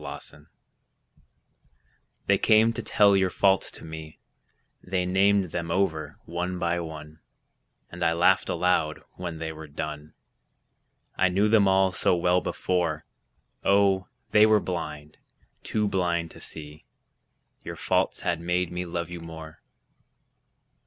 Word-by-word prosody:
Faults - - -7 1.9
They - - +3
came 110 +1 +4
to - - -4
tell 100 -1 +4
your 95 -1 +3
faults 95 +1 +2
to - - -10
me, 80 -1 -9 0.6
They 90 -1 -1
named 95 0 +2
them 85 -1 -3
over 85 -3 -1
one 90 +2 -3
by 85 0 0
one; 80 -2 -8 0.7
I 80 - 0
laughed 85 +2 +3
aloud 80 -4 0
when 85 -2 -5
they 80 0 -4
were 80 0 -9
done, 75 +1 -6 1.0
I 95 - +4
knew 100 +4 +2
them 105 -2 +4
all 95 0 +3
so 90 - +2
well 90 +1 +2
before, 85 -4 -1 0.6
Oh, 100 -1 +3 0.2
they 105 0 +6
were 110 -1 +5
blind, 75 -5 -6 0.4
too 105 -1 -1
blind 85 -4 -1
to - - -13
see 75 0 -10 0.8
Your - - -6
faults - - 0
had 85 -2 -1
made 90 +1 -1
me 90 0 -4
love 85 0 -4
you 90 - -6
more. 80 -1 -10
90 Hz, 130 wpm, -26 LUFS, 80-95 Hz, 1.9 s, they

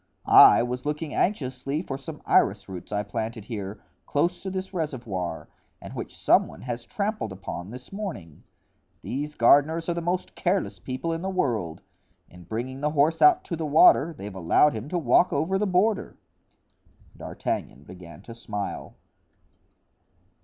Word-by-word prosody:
I - - +8
was 125 +1 -4
looking 150 +1 -3
anxiously 140 -4 -1
for 135 - -5
some 150 +3 -9
iris 100 0 +2
roots 90 -3 -9
I 105 0 -1
planted 110 +1 -5
here, 100 -3 -6 0.2
close 170 +5 0
to 195 - -4
this 190 +1 -5
reservoir, 120 - -4 0.3
and - - -10
which - - -7
some - - +4
one - - -12
has 120 -2 -5
trampled 205 - -3
upon 95 -1 -7
this 125 - -11
morning. 165 - -7 0.6
These 150 +3 -4
gardeners 145 +7 +4
are - - +1
the 170 - -3
most 175 +2 -2
careless 185 +2 -1
people 135 +6 -4
in 165 - -4
the 190 - -3
world; 110 - -1 0.5
in 90 -1 -14
bringing 125 +7 -5
the 150 - +1
horse 155 +2 +2
out 365 -1 +6
to 170 - -4
the 160 - -4
water 150 +1 +6
they've 105 -10 -8
allowed 95 - +3
him 115 +5 -6
to 180 - -1
walk 165 +4 +3
over 165 +7 0
the 210 - 0
border." 195 +3 +1 1.0
D'Artagnan 70 - -5
began 85 -1 -12
to 115 - -10
smile. 105 -3 -6
135 Hz, 160 wpm, -26 LUFS, 105-170 Hz, 1.0 s, I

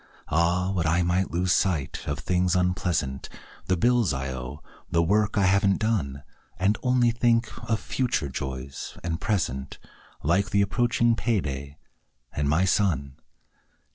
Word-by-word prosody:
Ah, 85 +3 +2
would 85 -4 0
I 85 +3 +2
might 90 +2 +1
lose 90 +1 +1
sight 85 -9 0
of 70 0 -1
things 90 +1 +1
unpleasant: 90 -7 -1 0.4
The 95 - +2
bills 120 - +3
I 65 0 -3
owe; 65 +3 -7 0.3
the 85 - +2
work 105 +5 +1
I 100 - +3
haven't 100 +1 +3
done. 80 -12 -1 0.3
And 95 +3 +2
only 125 -2 +3
think 115 0 +2 0.2
of 110 -2 +2
future 120 - -1
joys 65 0 -6
and 80 -1 -3
present, 75 - -2 0.5
Like 95 +8 +2
the 100 -2 +3
approaching 120 +2 +2
payday, 75 - -2 0.6
and 70 -1 -1
my 85 +6 +3
son. 80 -9 0
90 Hz, 140 wpm, -26 LUFS, 75-105 Hz, 0.6 s, bills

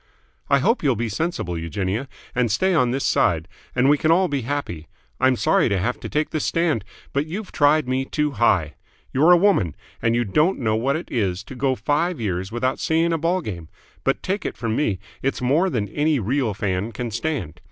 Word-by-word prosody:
"I 140 - +5
hope 230 - +2
you'll 135 -5 +2
be 115 +1 -2
sensible, 105 - -2
Eugenia, 95 - -2 0.3
and 120 -3 +1
stay 185 - +2
on 125 -7 +3
this 135 +3 -1
side, 80 0 +2 0.3
and 125 +1 +3
we 145 +1 +4
can 155 - +1
all 180 +3 +4
be 140 -4 -1
happy. 115 - -4 0.3
I'm 130 0 +4
sorry 120 - +2
to 100 - +1
have 115 +7 -1
to - - -6
take 150 +1 -1
this 155 - -1
stand, 165 - +1 0.3
but 140 +2 0
you 190 +7 -4
tried 150 -5 +2
me 130 +1 0
too 150 +1 -1
high. 90 - +2 0.4
You're 150 +6 +4
a 175 - +8
woman, 170 - +2 0.3
and 115 0 +2
you 120 - +2
don't 150 - +2
know 110 -3 0
what 130 +5 +1
it 165 - -6
is 100 -5 -1
to 130 - -10
go 130 0 0
five 145 - 0
years 95 -3 -2
without 130 +3 -1
seeing 165 +1 +1
a 165 - 0
ball 175 +4 +1
game; 85 - -7 0.3
but - - 0
take 195 +1 -2
it - - -4
from 115 -2 -2
me 110 -10 +1 0.2
it's 135 - -1
more 145 +10 +2
than 110 - -1
any 150 +6 +1
real 120 -1 0
fan 100 +2 -2
can 120 -2 -4
stand. 125 - -3
130 Hz, 215 wpm, -22 LUFS, 105-155 Hz, 0.4 s, a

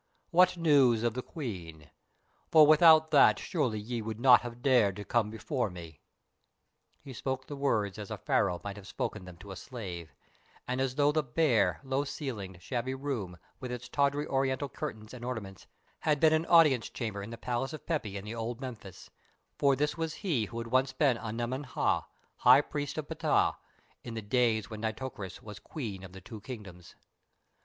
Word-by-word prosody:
What 180 +1 +5
news 140 -9 +4
of 120 -2 +1
the 125 - -3
Queen? 85 - -7 0.6
For 155 -2 +8
without 155 0 +7
that 145 -3 +6
surely 135 - -1
ye 115 +2 -4
would 110 0 -5
not 125 0 +7
have 120 0 -8
dared 120 -8 +4
to 105 - -7
come 115 -3 +1
before 115 +2 -2
me." 85 -4 -11 1.0
He 135 -2 -9
spoke 130 +2 -3
the 145 - -7
words 110 -8 0
as 105 - -7
a - - -4
Pharaoh 90 -1 +1
might 100 0 -6
have 100 -1 -11
spoken 100 -1 -4
them 90 -2 -11
to 100 +3 -11
a - - -6
slave, 90 - -7 0.6
and 125 +1 -1
as 130 -1 -1
though 145 0 +3
the 155 +1 +1
bare, 135 -2 +1
low 135 +1 0
ceiled, 115 - -6
shabby 130 +3 -2
room, 125 -11 -4 0.2
with 125 -1 -6
its 125 0 -6
tawdry 145 +1 +1
Oriental 135 0 0
curtains 110 -7 -6
and 125 -2 -9
ornaments, 110 -6 -6 0.3
had 150 -2 +1
been 160 0 +5
an 160 +1 +1
audience 150 -8 +5
chamber 110 -5 -4
in 100 - -7
the 115 - -7
palace 125 +4 -2
of 155 - -9
Pepi 110 - -2
in 100 +1 -8
old 115 +1 -4
Memphis, 115 -8 -9 0.5
for 140 -1 +4
this 150 +4 -1
was 160 -1 -2
he 135 - +1
who 115 - -9
had 115 - -3
once 130 +1 +3
been 135 -2 +3
Anemen 120 +4 -3
Ha, 125 -6 0 0.3
High - - +7
Priest 145 0 -5
of 155 -2 -4
Ptah, - - +1 0.5
in 120 -2 -7
the 110 - -5
days 110 -1 +1
when 110 -2 -8
Nitocris 110 -3 -5
was 105 -1 -9
Queen 105 -11 -6
of 95 - -10
the 95 - -10
Two 105 +3 -10
Kingdoms. 100 -8 -10
120 Hz, 185 wpm, -30 LUFS, 105-140 Hz, 1.0 s, For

